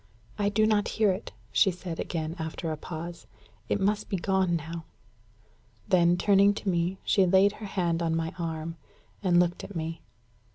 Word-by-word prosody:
"I 205 0 +2
do 215 +1 +3
not 215 -1 +2
hear 215 -3 +4
it," 190 +4 -5 0.2
she 200 - +4
said 180 -2 -6
again, 160 -1 -3
after 160 +1 -3
a - - -1
pause. 170 +2 -7 0.4
"It - - +1
must 205 +2 0
be 195 - 0
gone 190 -1 +1
now." 165 +1 -5 1.0
Then, 175 -3 +4
turning 200 +1 +4
to 205 - -7
me, 175 +1 0
she 195 -2 +3
laid 190 +2 +5
her 210 - -5
hand 170 -4 0
on 165 -1 +1
my 165 0 -2
arm, 165 0 -4 0.4
and 180 -3 +4
looked 175 0 +1
at 205 - -9
me. 165 0 -4
175 Hz, 175 wpm, -28 LUFS, 165-195 Hz, 1.0 s, laid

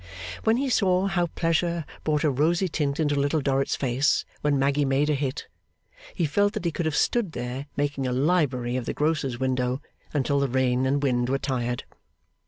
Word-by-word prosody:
When 225 +1 +4
he 275 +2 0
saw 190 -6 +2
how 185 -3 +1
pleasure 165 0 0 0.2
brought 150 -1 +1
a 150 - +3
rosy 165 +7 +2
tint 145 -3 -1
into 150 -2 +2
Little 145 +2 +1
Dorrit's 135 -1 0
face 135 +3 +1 0.2
when 145 -1 +2
Maggy 140 +2 +2
made 140 +2 +2
a - - +3
hit, 140 -1 -2 0.7
he 170 - +1
felt 205 +7 +2
that 215 -6 -4
he 170 - +1
could 160 +1 -2
have 155 - -1
stood 210 -4 +1
there 125 +3 -5
making 145 -2 -1
a - - -1
library 130 -4 +1
of 125 - -4
the - - -2
grocer's 150 -5 0
window 130 0 0 0.3
until 140 -1 +1
the 140 -1 +1
rain 130 0 +1
and 140 +2 +1
wind 120 -2 +1
were 135 - +2
tired. 125 -3 -2
145 Hz, 190 wpm, -26 LUFS, 130-165 Hz, 0.7 s, When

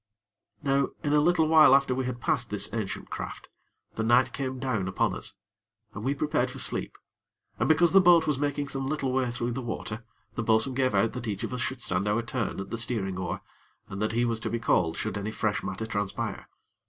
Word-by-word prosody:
Now, 140 -1 +2 0.2
in 145 - +1
a 150 - +5
little 160 0 +3
while 155 -4 +7
after 140 -2 +3
we 130 0 -1
had 125 -1 -4
passed 130 -5 0
this 105 - -1
ancient 110 -4 -4
craft, - - -6 0.4
the - - -3
night 120 +3 +4
came 130 -1 -3
down 125 -8 -1
upon 95 - 0
us, - - -5 0.6
and 105 - -7
we 135 +3 0
prepared 145 -3 0
for - - -8
sleep, - - 0 0.6
and - - +1
because 160 +2 +5
the 195 - +7
boat 175 -2 +6
was 150 -3 0
making 145 0 -1
some 135 -1 -3
little 135 -3 -1
way 130 -1 +1
through 120 0 -2
the 130 +2 -3
water, 115 -1 -5 0.3
the 115 - -2
bo'sun 110 +4 +3
gave 130 -4 +1
out 105 +3 +2
that 120 - -5
each 100 -2 -3
of - - -3
us 125 - -3
should 130 -2 -3
stand 100 - -1
our 110 +3 +1
turn 115 -4 -3
at 95 - -6
the 115 - -2
steering 100 -6 -2
oar, 90 - -3 0.5
and 100 +1 -5
that 110 +1 0
he 120 +1 +2
was 115 -1 -1
to - - -3
be 115 - -1
called 85 -7 +1
should 105 -1 -3
any 100 +1 -3
fresh 105 -1 -1
matter 95 +3 -4
transpire. 100 -3 -3
120 Hz, 225 wpm, -28 LUFS, 110-140 Hz, 0.6 s, while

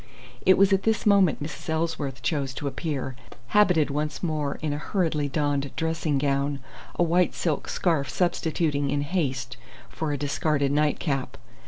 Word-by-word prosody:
It 190 - +7
was 195 0 +5
at 195 - +3
this 220 +1 0
moment 195 -8 +4
Mrs. 150 +1 -7
Ellsworth 160 -4 -2
chose 140 -4 -1
to 145 - -5
appear, 140 -3 -3 0.3
habited 180 -8 +4
once 150 +3 -3
more 150 -4 -1
in 150 -2 0
a 145 - -3
hurriedly 155 -5 0
donned 145 -1 0
dressing 160 -2 0
gown, 140 0 0 0.4
a - - +2
white 175 +1 +2
silk 155 -5 -1
scarf 160 -6 0
substituted 160 -5 0
in 145 +1 0
haste 130 -6 -2 0.3
for 155 -2 -3
a 145 - -1
discarded 145 0 0
nightcap. 145 -2 0
150 Hz, 155 wpm, -26 LUFS, 140-165 Hz, 0.4 s, It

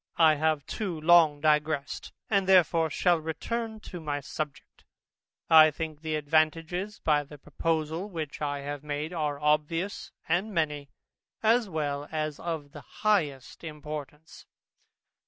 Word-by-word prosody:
I 160 -2 +6
have 155 -2 0
too 185 -7 -4
long 160 -2 +5
digressed, 150 -1 0 0.2
and 200 -5 +1
therefore 170 -3 +5
shall 175 +3 +2
return 220 +8 -4
to 180 - -8
my 145 -2 -3
subject. 145 0 -7 0.6
I 155 -1 +8
think 155 0 -6
the 160 -1 -2
advantages 160 +6 0
by 150 -2 +2
the 150 +1 -12
proposal 160 +5 -2
which 160 -6 -6
I 145 -1 -2
have 145 0 -5
made 150 +3 -4
are 150 -4 -2
obvious 150 +6 0 0.2
and 180 +6 0
many, 150 -3 -1 0.5
as 225 -1 +3
well 145 -3 -2
as 155 -2 -2
of 160 -4 -4
the - - -10
highest 160 - -1
importance. 150 -1 -8
155 Hz, 135 wpm, -28 LUFS, 150-170 Hz, 0.6 s, I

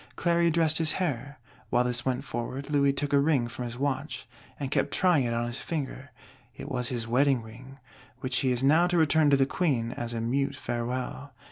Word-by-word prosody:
Cléry 170 -1 +2
dressed 160 -1 +2
his 160 -1 +3
hair: 145 -6 -3 0.3
while 120 - +3
this 125 0 -1
went 130 -1 -1
forward, 130 +5 -5
Louis 140 -1 +3
took 145 +1 -2
a 140 - +6
ring 140 -5 +2
from 120 +1 -6
his 120 0 -6
watch, 140 +2 -3 0.3
and 140 -2 -4
kept - - +1
trying 175 -8 +3
it 115 - -1
on 120 0 0
his 120 +1 -4
finger; 145 -3 -5 0.5
it - - -8
was 125 -2 0
his 120 -3 -2
wedding 130 0 +2
ring, 125 +5 -12 0.4
which 130 -1 -1
he 130 - +1
is 125 +1 +1
now 160 +6 +5
to 175 0 +1
return 160 -1 +4
to 140 - +5
the 135 - +3
Queen 135 -7 0
as 120 -1 -5
a - - -2
mute 130 +5 -1
farewell. 125 +3 -4
135 Hz, 210 wpm, -28 LUFS, 120-145 Hz, 0.5 s, a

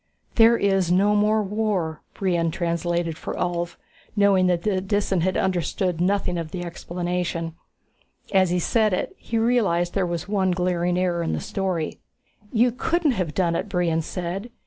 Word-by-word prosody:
"There 230 0 +6
is 195 -4 +2
no 200 +3 +4
more 210 +1 +3
war," 195 -6 -1
Brion 175 -4 +1
translated 170 -1 -1
for - - -5
Ulv, 175 -1 -2 0.4
knowing 200 -3 +4
that 175 -1 +1
the 195 -3 +1
Disan 195 -2 0
had 185 +2 +1
understood 180 -1 0
nothing 180 -2 +1
of 165 -2 -5
the 175 +1 -5
explanation. 175 -1 -3 0.8
As 190 -2 +4
he 180 - +1
said 215 +3 +2
it, 185 - -2
he 230 - -4
realized 215 -7 +2
that - - -20
there 190 - +2
was 170 +1 -3
one 195 -2 +1
glaring 180 0 0
error 180 -2 +1
in 165 - -1
the - - -1
story. 185 -5 -3 0.5
"You 240 +1 +3
couldn't 320 +5 +1
have 180 - -2
done 170 -3 +1
it," 205 - -2
Brion 175 -4 +1
said. 180 +6 -4
180 Hz, 170 wpm, -24 LUFS, 170-200 Hz, 0.8 s, There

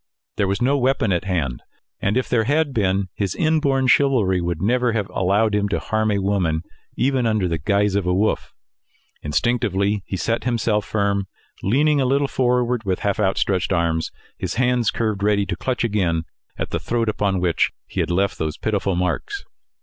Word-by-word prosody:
There 100 - +1
was 100 +4 -1
no 140 +3 +2
weapon 125 -5 +1
at 85 -1 0
hand; 80 -10 -2 0.4
and 100 +5 0
if 130 - 0
there 115 -2 +1
had 145 +2 +1
been, 95 -3 0
his 100 -4 -2
inborn 145 -5 +2
chivalry 125 -9 +3
would 85 -2 -2
never 120 +5 +1
have 105 -4 -1
allowed 100 +4 +1
him 100 0 +1
to - - 0
harm 110 0 0
a 105 - +1
woman 95 -5 0 0.3
even 130 -1 +1
under 110 -4 +1
the 85 -2 -2
guise 100 +4 +1
of 100 -2 0
a 90 - +2
wolf. 105 +3 0 0.7
Instinctively, 100 +3 0
he 95 - -3
set 115 +5 -1
himself 115 -4 0
firm, 100 -2 0 0.3
leaning 145 +7 +2
a - - +2
little 140 +2 +2
forward, 125 -2 +1
with 95 -3 -1
half 100 +2 0
outstretched 95 -2 +1
arms, 85 -2 0 0.3
and - - -3
hands 125 -2 +2
curved 110 -3 -1
ready 100 -1 +2
to - - -3
clutch 130 -2 -2
again 90 -8 0 0.3
at - - -4
the - - -1
throat 115 -1 -1
upon 100 -3 0
which 90 -2 +2 0.2
he - - -6
had 85 -2 0
left 95 +3 0
those 80 -1 -2
pitiful 100 -3 -1
marks. 90 - -2
105 Hz, 185 wpm, -22 LUFS, 95-120 Hz, 0.7 s, chivalry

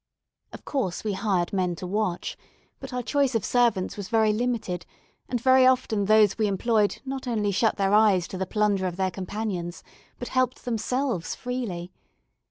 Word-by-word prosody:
Of - - -11
course 245 -11 -2
we 215 -2 -1
hired 190 -4 0
men 180 -2 0
to 180 - -7
watch; 185 -1 -2 0.4
but - - -8
our 250 0 -3
choice 275 0 +1
of 225 - 0
servants 235 -7 +1
was 200 -2 -6
very 220 -2 +3
limited, 215 -6 -2 0.5
and 245 - -1
very 260 +1 +5
often 220 -5 +2
those 215 0 +4
we 215 - +3
employed 210 +1 +1
not 265 -1 -5
only 210 -4 0
shut 215 +3 +2
their 195 0 +1
eyes 210 -5 +4
to 190 - -6
the 190 - -2
plunder 205 -2 +1
of 175 - -4
their 190 -1 0
companions, 185 -2 -4 0.3
but 245 - -6
helped 255 0 0
themselves 245 -4 -1
freely. 215 -9 -4
210 Hz, 175 wpm, -26 LUFS, 190-245 Hz, 0.5 s, very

